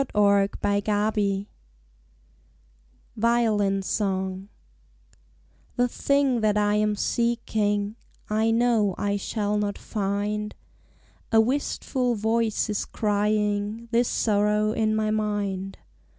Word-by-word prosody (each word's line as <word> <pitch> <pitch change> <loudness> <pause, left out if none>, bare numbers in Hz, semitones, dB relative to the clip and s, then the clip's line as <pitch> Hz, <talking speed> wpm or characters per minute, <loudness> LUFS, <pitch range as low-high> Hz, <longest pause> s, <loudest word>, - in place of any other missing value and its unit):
Vigils 205 0 +1 1.7
VIOLIN 210 -4 +2
SONG 190 -1 -2 1.3
The 245 -1 +2
thing 275 -1 +1
that 210 -1 +2
I 205 0 +2
am 210 0 +1
seeking 215 -2 0 0.3
I 220 +1 +1
know 225 -4 +2
I 205 0 0
shall 210 +1 -1
not 205 -1 -2
find. 210 +1 -3 0.8
A 225 - +5
wistful 250 0 0
voice 220 +1 0
is 210 -2 -2
crying 210 +1 -1
This 240 +1 +3
sorrow 210 0 +1
in 220 -1 +1
my 215 0 0
mind. 205 -3 -2
210 Hz, 95 wpm, -25 LUFS, 205-225 Hz, 1.7 s, A